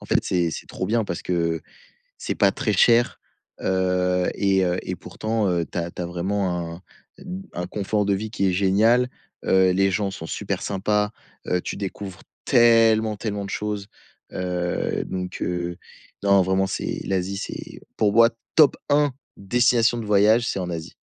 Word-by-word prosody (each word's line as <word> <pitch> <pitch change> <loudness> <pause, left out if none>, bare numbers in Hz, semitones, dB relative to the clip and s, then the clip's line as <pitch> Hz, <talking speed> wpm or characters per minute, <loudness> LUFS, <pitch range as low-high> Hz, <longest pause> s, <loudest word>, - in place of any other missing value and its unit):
en - - -12
fait, - - +3
c'est 85 -2 +1
c'est - - -7
trop - - -5
bien 110 +3 +1
parce 85 - -5
que 85 -2 0 0.6
c'est - - -3
pas 100 -2 +4
très 110 +1 -1
cher, 115 +5 +4 0.4
heu, 90 -1 +1
et 95 -1 +2
heu, 90 0 0
et 90 - -5
pourtant, 105 +4 -2
heu, 85 -2 0
tu - - -9
as 85 0 -2
tu 90 - -9
as 90 - -2
vraiment 90 -1 -2
un 90 - -16 0.4
d 190 +1 -7
un 90 0 -4
confort 105 +1 -1
de 100 - +2
vie 105 +3 -4
qui 100 -3 0
est 90 - +1
génial, 110 +7 +3 0.3
heu, 95 -1 +4
les 95 +1 +2
gens 100 +1 -1
sont 90 -4 -7
super - - -3
sympas, 105 +1 0 0.4
heu, 90 - +1
tu - - -5
découvres 95 -1 -6 0.2
tellement, 115 -3 +4
tellement 105 -1 -3
de 100 - -7
choses, 105 -1 -3 0.4
heu, 90 -1 -2
donc 90 -1 -5
heu, 90 0 -2 0.5
non 100 -1 +5
vraiment 95 +1 +2
c'est - - -3
l'Asie, 95 0 -1
c'est 100 - -7 0.2
pour 105 - +3
moi 115 +1 +7 0.2
top 155 -3 +6
1 145 -1 +3 0.2
destination 120 +2 +2
de 110 - -5
voyage, 105 +4 +4
c'est - - -2
en 90 -1 -3
Asie. 80 -2 -6
100 Hz, 180 wpm, -23 LUFS, 90-110 Hz, 0.6 s, moi